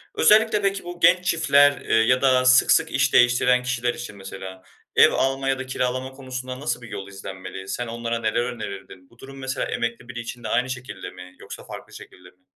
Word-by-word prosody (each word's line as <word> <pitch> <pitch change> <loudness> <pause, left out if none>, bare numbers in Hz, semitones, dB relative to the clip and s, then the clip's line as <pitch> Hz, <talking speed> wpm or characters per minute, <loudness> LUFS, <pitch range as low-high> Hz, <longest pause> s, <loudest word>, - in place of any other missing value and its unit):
Özellikle 215 -1 +4
de, 195 0 +2
ki, 195 - -7
bu 175 0 -8
genç 180 +1 +4
çiftler, 145 -4 +4
eee, - - 0
ya 115 +3 +3
da 130 -1 +3
sık 130 0 +5
sık - - +3
iş - - +1
değiştiren 125 0 +4
kişiler 125 -1 -1
için, 120 -4 -8
mesela, 95 -1 -9 0.3
ev - - +7
alma 135 0 0
ya 135 -1 0
da 130 - -5
kiralama 130 0 -2
konusunda, 130 -1 -7
nasıl 140 -3 -3
bir 115 - -11
yol 100 -2 -7
izlenmeli? 95 -1 -9
Sen 120 +4 -4
onlara 115 0 -3
neler 110 +1 0
önerirdin? 100 -6 -8
Bu 120 - -24
durum, 135 +1 -11
mesela, 130 -1 -3
emekli 115 +1 -4
biri 125 0 -6
için 120 0 -8
de - - -4
aynı 125 +1 0
şekilde 125 -7 -7
mi, 90 0 -13
yoksa - - -10
farklı - - -10
şekilde 90 0 -13
mi? 90 +1 -31
125 Hz, 210 wpm, -23 LUFS, 110-130 Hz, 0.3 s, ev